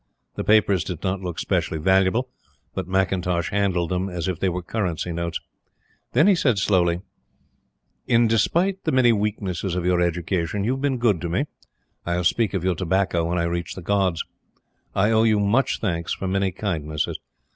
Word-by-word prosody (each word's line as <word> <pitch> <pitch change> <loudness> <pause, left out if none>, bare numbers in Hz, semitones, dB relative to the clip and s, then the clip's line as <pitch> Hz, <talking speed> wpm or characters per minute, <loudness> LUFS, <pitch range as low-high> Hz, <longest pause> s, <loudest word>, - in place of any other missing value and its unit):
The - - -4
papers 100 -4 +3
did 85 -1 -6
not 95 0 -1
look 90 -3 -5
specially 80 - -1
valuable; 95 +8 +2 0.5
but - - -4
McIntosh 90 -2 0
handled 95 -4 0
them 90 +1 -1
as 90 -2 -3
if 90 -3 -2
they 95 - +1
were 90 0 -4
currency 90 -4 -2
notes. 85 0 -3 0.7
Then - - +5
he 200 - +6
said 140 - +2
slowly: 90 -3 +2 1.1
"In 120 -1 +4
despite 170 - +1
the - - 0
many 130 -2 +5
weaknesses 100 -4 -2
of 90 -1 -2
your 90 -1 +2
education, 90 +2 -1
you 115 - +1
have 135 0 -2
been 140 -2 +1
good 110 -8 +2
to 85 - -3
me. 130 - 0 0.6
I 85 - -1
will 90 - -1
speak 105 +4 +1
of 90 - -1
your 95 0 +2
tobacco 90 0 0
when 85 +2 -1
I 85 - +1
reach 85 0 -3
the 95 - -8
Gods. 95 -3 +1 0.7
I 105 +3 +3
owe 110 0 +4
you 110 -2 +3
much 115 +6 +2
thanks 85 -5 -2
for 95 - -4
many 95 0 +1
kindnesses. 80 -6 -3
95 Hz, 185 wpm, -23 LUFS, 85-105 Hz, 1.1 s, he